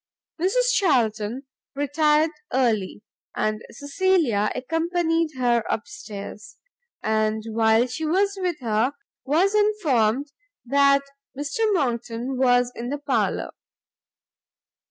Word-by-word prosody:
Mrs - - +2
Charlton 235 - +1 0.3
retired 300 +2 +2 0.2
early, 220 -6 0 0.3
and 215 0 -1
Cecilia 285 - +1
accompanied 330 +2 0
her 240 -2 +2
up 220 - -2
stairs: 210 - -9 0.5
and 215 0 0
while 225 +1 +3
she 310 +6 -4
was 395 +5 +1
with 350 -5 -2
her, 230 +3 +1 0.3
was 340 +9 +2
informed 290 - +1 0.3
that 280 +2 +4 0.3
Mr 290 +6 -4
Monckton 240 -4 -2
was 245 -1 +3
in 240 +1 -5
the 290 - -2
parlour. 285 -1 -1
275 Hz, 100 wpm, -24 LUFS, 230-325 Hz, 0.5 s, that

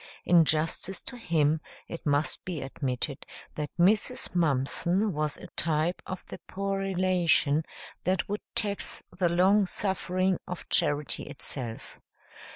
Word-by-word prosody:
In 170 -2 +6
justice 160 +4 0
to 250 - -7
him, 160 -8 +1 0.3
it 165 - -6
must 145 +1 +1
be 180 -4 -4
admitted 135 +1 -3 0.3
that 150 -1 -3
Mrs. 210 +7 +3
Mumpson 170 +5 +1
was 150 -1 -1
a - - -10
type 160 +2 +1
of 185 - -6
the - - -9
poor 195 0 -2
relation 180 -6 +2 0.4
that 185 +1 +1
would 205 +1 -3
tax 205 -2 -1
the 180 -1 +2
long 190 +4 +4
suffering 185 -1 0
of 180 - -6
charity 145 -4 +1
itself. 130 -5 -5
175 Hz, 130 wpm, -28 LUFS, 150-190 Hz, 0.4 s, In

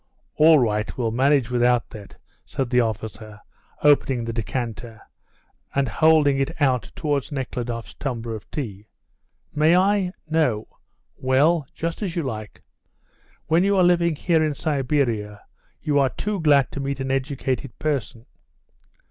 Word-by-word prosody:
"All 160 +1 +7
right; 105 -5 0
we'll 115 -3 -1
manage 130 0 +2
without 120 0 +2
that," 105 -2 -11 0.3
said 130 -3 -4
the 125 - +4
officer, 110 -1 -5 0.4
opening 135 -4 +3
the 115 - -4
decanter, 115 0 -4 0.8
and 140 -1 +2
holding 150 +2 +3
it 135 +5 -2
out 125 -9 +1
towards 145 -2 -2
Nekhludoff's 125 -4 -4
tumbler 120 -4 -4
of 105 -4 -9
tea. 105 -8 -6 0.7
"May 155 +4 +4
I? 190 -1 +2
No? 150 -9 0 0.5
Well, 140 +4 +2
just 165 +4 -4
as 185 -5 -3
you 170 - -1
like. 110 -6 -6 0.8
When 165 +3 +3
you 200 0 +2
are 185 - +5
living 170 -2 +3
here 160 +1 +1
in 150 -2 -1
Siberia 130 -9 -1 0.4
you 145 -2 +2
are 135 -1 +3
too 210 +8 -3
glad 145 -5 +3
to - - -6
meet 135 0 -3
an 135 0 -2
educated 135 -2 -2
person. 130 -6 -3
135 Hz, 140 wpm, -23 LUFS, 115-155 Hz, 0.8 s, All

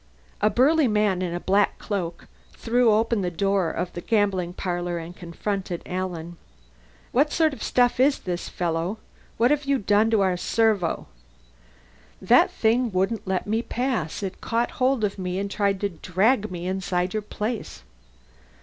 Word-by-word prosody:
A 210 - +4
burly 275 +7 +4
man 210 -4 +1
in 180 -2 -2
a - - -2
black 200 +3 +2
cloak 175 -5 -4 0.3
threw 240 0 +2
open 225 0 +2
the 180 - -1
door 195 0 +1
of 180 +2 -4
the 175 - -5
gambling 200 -5 +1
parlor 175 -1 -3
and 170 +1 -7
confronted 180 +1 -4
Alan. 175 -2 -4 0.7
"What 290 +4 +2
sort 320 -2 +2
of 245 - -10
stuff 245 -1 +2
is 275 +2 +4
this, 175 -1 -4
fellow? 170 +4 -2 0.4
What 240 +4 +3
have 290 -1 +1
you 280 0 +2
done 210 0 +3
to 220 -3 +3
our 185 -2 +2
servo?" 210 -3 +1 1.1
"That - - +5
thing 235 +1 +1
wouldn't 195 +3 -1
let 190 -1 -1
me 220 +2 0
pass. 235 - -2
It 190 -1 -5
caught 235 +1 0
hold 255 -2 +2
of 200 -1 -1
me 180 0 -3
and 200 0 -3
tried 200 -2 0
to 200 - 0
drag 200 +6 +1
me 175 -1 -6
inside 180 -1 -1
your 215 - -1
place." 210 - -5
200 Hz, 165 wpm, -24 LUFS, 180-230 Hz, 1.1 s, That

